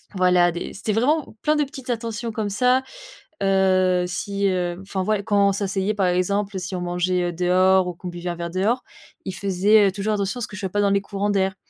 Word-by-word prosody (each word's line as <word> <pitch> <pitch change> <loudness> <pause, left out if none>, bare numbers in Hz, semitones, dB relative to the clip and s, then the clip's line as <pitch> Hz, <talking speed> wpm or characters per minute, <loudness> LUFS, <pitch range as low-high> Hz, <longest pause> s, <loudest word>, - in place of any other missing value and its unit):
voilà, 180 -1 +4
des 170 - -6
c'était 205 +2 -3
vraiment 270 +4 +1
plein 305 0 +3
de 295 - +3
petites 265 -2 -10
attentions 230 -1 -3
comme 210 -2 -2
ça, 250 +5 +2 0.6
heu, 185 -2 +3
si, 200 +2 -1
heu, 180 -2 -1
enfin, 190 -1 -3
ouais, 215 0 0
quand 200 -1 +3
on 200 - +2
s'asseyait, 195 +1 -1
par 195 -3 +1
exemple, 195 +3 0
si 185 +1 -4
on - - -4
mangeait 175 0 0
dehors 185 +1 +3
ou 180 - -4
qu'on 180 +2 -8
buvait 175 0 -5
un 175 - -4
verre 170 0 -5
dehors, 205 +8 0 0.4
il 190 - -5
faisait, 200 +2 +3
heu, - - -2
toujours 210 +2 -1
attention 200 +3 -2
à - - -3
ce - - -4
que 210 - -9
je - - -7
sois 190 - -2
pas 205 - 0
dans 200 - +3
les 200 0 +2
courants 200 +1 -2
d'air. 190 -1 +1
195 Hz, 230 wpm, -23 LUFS, 180-210 Hz, 0.6 s, voilà